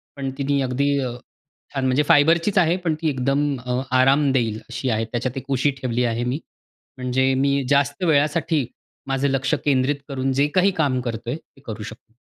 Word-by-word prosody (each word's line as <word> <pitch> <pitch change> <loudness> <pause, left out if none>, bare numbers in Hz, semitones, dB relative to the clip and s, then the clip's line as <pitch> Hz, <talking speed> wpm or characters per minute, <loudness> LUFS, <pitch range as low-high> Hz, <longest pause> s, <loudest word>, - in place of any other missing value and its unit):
पण 135 -1 -4
तिनी 140 0 0
अगदी 140 +2 0
अ, 130 -2 -2 0.6
छान 135 -2 -1
म्हणजे 130 +3 +2
फायबरचीच 165 +7 +4
आहे, 175 -2 +4
पण 175 -3 -1
ती 160 - +1
एकदम 140 +1 0
अ, 125 0 -1 0.2
आराम 135 +2 +4
देईल 115 -5 0
अशी 120 +2 -3
आहे. 110 -1 0
त्याच्यात 125 +2 -2
एक 135 - -5
उशी 135 +2 +2
ठेवली 125 -1 0
आहे 115 0 -1
मी. 125 +4 -2 0.6
म्हणजे 130 +1 +1
मी 140 +1 +1
जास्त 145 +4 +1
वेळासाठी 155 -2 +2 0.4
माझं 135 +1 0
लक्ष 135 0 0
केंद्रित 135 0 +2
करून 135 -1 -1
जे 145 - +4
काही 190 +2 +4
काम 140 -5 +1
करतो 115 -1 -5
आहे, 135 - -2
ते 135 - -23
करू 110 -1 -6
शकतो. 110 +1 -11
135 Hz, 185 wpm, -22 LUFS, 125-145 Hz, 0.6 s, फायबरचीच